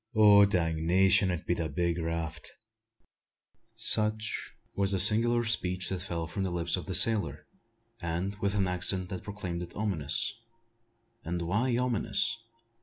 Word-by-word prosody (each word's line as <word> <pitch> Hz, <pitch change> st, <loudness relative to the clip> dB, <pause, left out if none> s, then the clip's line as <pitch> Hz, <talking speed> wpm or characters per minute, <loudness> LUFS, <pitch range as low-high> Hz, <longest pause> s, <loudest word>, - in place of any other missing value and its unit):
"Dangnation! 95 Hz, -3 st, +4 dB
it 90 Hz, -3 st, -3 dB
be -, -, +1 dB
the 85 Hz, -2 st, -3 dB
big 85 Hz, -1 st, -1 dB
raft." 80 Hz, -1 st, -3 dB, 1.3 s
Such 110 Hz, 0 st, 0 dB, 0.2 s
was 100 Hz, 0 st, +1 dB
the -, -, +1 dB
singular 115 Hz, +5 st, +4 dB
speech 90 Hz, -5 st, -2 dB
that 95 Hz, -2 st, -3 dB
fell 85 Hz, -3 st, -4 dB
from 90 Hz, +5 st, -5 dB
the 95 Hz, -, -1 dB
lips 85 Hz, -1 st, -1 dB
of -, -, -7 dB
the -, -, -1 dB
sailor, 110 Hz, -2 st, +2 dB, 0.6 s
and 85 Hz, +4 st, -3 dB
with 100 Hz, +1 st, -1 dB
an 100 Hz, -2 st, +1 dB
accent 90 Hz, +1 st, -1 dB
that 90 Hz, -2 st, -5 dB
proclaimed 90 Hz, -4 st, -5 dB
it 90 Hz, -, -8 dB
ominous. 90 Hz, -8 st, -1 dB, 0.9 s
And 85 Hz, +1 st, -3 dB
why 115 Hz, +8 st, 0 dB
ominous? 120 Hz, -1 st, 0 dB
95 Hz, 140 wpm, -29 LUFS, 85-105 Hz, 1.3 s, Dangnation